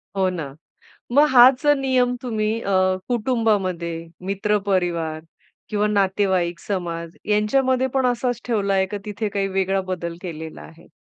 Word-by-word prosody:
हो 190 -1 +2
ना, 150 -6 -6 0.6
मग 290 +4 +5
हाच 255 +1 +7
जर 290 -1 +4
नियम 255 -2 +1
तुम्ही 215 -4 -1
अ, 200 - -3 0.4
कुटुंबामध्ये, 210 -8 0 0.4
मित्र 210 +2 +1
परिवार 170 -4 0 0.5
किंवा 210 -1 +1
नातेवाईक, 190 -4 +1
समाज 170 -3 -4
यांच्यामध्ये 255 +5 +2
पण 265 -1 +2
असाच 245 0 -1
ठेवला 200 -4 0
आहे 190 0 +3
का - - -1
तिथे 210 +1 -3
काही 195 -1 -1
वेगळा 195 0 0
बदल 170 -2 -4
केलेला 160 -3 -7
आहे? 165 +1 -15
200 Hz, 140 wpm, -22 LUFS, 180-240 Hz, 0.6 s, हाच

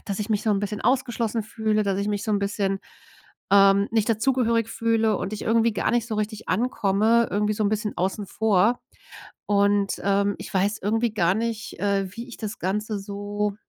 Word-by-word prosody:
dass 200 -2 -3
ich 210 - -3
mich 210 - +1
so 220 - +1
'n 200 - +2
bisschen 205 0 -3
ausgeschlossen 240 -3 0
fühle, 215 -1 0
dass 195 -1 0
ich 200 +1 -1
mich 205 -1 -2
so 215 - -1
'n 205 - +2
bisschen, 200 -1 -1 0.7
ähm, 200 0 +6
nicht 220 0 +1
dazugehörig 230 0 +1
fühle 225 -2 +1
und 190 - -4
ich 215 - -5
irgendwie 230 0 +2
gar 205 - 0
nicht 240 -1 +1
so 215 - -3
richtig 215 0 -4
ankomme, 220 +1 +2
irgendwie 210 +1 +1
so 215 - -2
ein - - +3
bisschen 215 0 -2
außen 190 +3 -2
vor. 220 +3 +2 0.7
Und, 200 -1 +2
ähm, 200 0 +1
ich - - -8
weiß 200 +3 +1
irgendwie 225 +2 0
gar 180 -1 +3
nicht, 225 -3 -4
äh, 200 0 +1
wie 235 +2 -7
ich 240 - -10
das 215 -1 -6
Ganze 210 +3 -2
so 205 +1 -3
210 Hz, 195 wpm, -24 LUFS, 200-225 Hz, 0.7 s, ähm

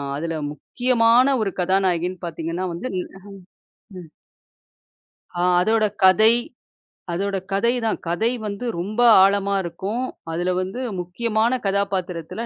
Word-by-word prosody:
அதுல 165 +2 -3 0.2
முக்கியமான 245 - +2
ஒரு 195 - -2
கதாநாயகின்னு 180 -1 0
பாத்தீங்கன்னா 165 +2 -4
வந்து 175 +10 -5
ம். - - -5 0.9
அம் - - -7
ம். 155 - -18 1.3
ஆ - - +1 0.2
அதோட 220 +2 +2 0.2
கதை 215 +5 +6 0.8
அதோட 195 +2 -2 0.2
கதை 235 +4 +2
தான். 220 - 0
கதை 215 +7 +1 0.2
வந்து 205 +4 -5
ரொம்ப 210 +6 -4 0.2
ஆழமா 200 0 +2
இருக்கும். 195 +9 -4 0.3
அதுல 175 +2 -1
வந்து 190 +8 -5 0.2
முக்கியமான 225 +6 -1
கதாபாத்திரத்துல 195 0 -2
195 Hz, 115 wpm, -22 LUFS, 180-225 Hz, 1.3 s, கதை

